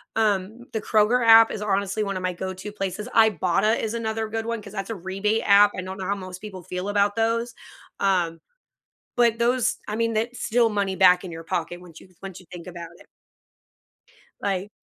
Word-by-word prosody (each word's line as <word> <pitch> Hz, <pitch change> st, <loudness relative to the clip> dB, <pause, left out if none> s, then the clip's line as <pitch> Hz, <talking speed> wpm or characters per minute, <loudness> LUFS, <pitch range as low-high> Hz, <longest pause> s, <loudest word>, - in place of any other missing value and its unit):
um, 215 Hz, +2 st, 0 dB
the 220 Hz, -, -2 dB
Kroger 225 Hz, +4 st, +2 dB
app 225 Hz, 0 st, +8 dB
is 210 Hz, -, -5 dB
honestly 200 Hz, 0 st, -1 dB
one 195 Hz, -2 st, -3 dB
of 185 Hz, -, -6 dB
my 185 Hz, -, -1 dB
go 190 Hz, +2 st, -5 dB
to 185 Hz, +3 st, -8 dB
places, 195 Hz, 0 st, -4 dB
Ibotta 215 Hz, 0 st, +3 dB
is 220 Hz, -, -3 dB
another 225 Hz, -1 st, -2 dB
good 225 Hz, 0 st, -3 dB
one 230 Hz, -1 st, -3 dB
'cause 200 Hz, 0 st, -12 dB
that's 195 Hz, +2 st, -5 dB
a 225 Hz, -, -3 dB
rebate 195 Hz, +4 st, -1 dB
app, 205 Hz, 0 st, +6 dB
I 185 Hz, -, -2 dB
don't 190 Hz, +1 st, -7 dB
know 190 Hz, -, -5 dB
how 200 Hz, -, 0 dB
most 185 Hz, -2 st, -8 dB
people 195 Hz, -4 st, -9 dB
feel 180 Hz, +3 st, -5 dB
about 205 Hz, 0 st, +1 dB
those, 230 Hz, +1 st, 0 dB, 0.5 s
um, 175 Hz, -4 st, +1 dB, 0.8 s
but 235 Hz, -2 st, +3 dB
those 240 Hz, +1 st, +1 dB
I 210 Hz, -, -3 dB
mean, 230 Hz, 0 st, 0 dB
that's 230 Hz, +3 st, -2 dB
still 235 Hz, 0 st, +2 dB
money 200 Hz, -2 st, -1 dB
back 180 Hz, 0 st, +5 dB
in 185 Hz, -, -6 dB
your 165 Hz, 0 st, -8 dB
pocket 175 Hz, 0 st, -3 dB
once 170 Hz, -3 st, -14 dB
you -, -, -17 dB
once 190 Hz, -1 st, -8 dB
you 185 Hz, -, -18 dB
think 175 Hz, 0 st, -10 dB
about 170 Hz, -2 st, -8 dB
it. -, -, -18 dB, 1.3 s
Like 195 Hz, +1 st, -2 dB
205 Hz, 205 wpm, -24 LUFS, 185-225 Hz, 1.3 s, app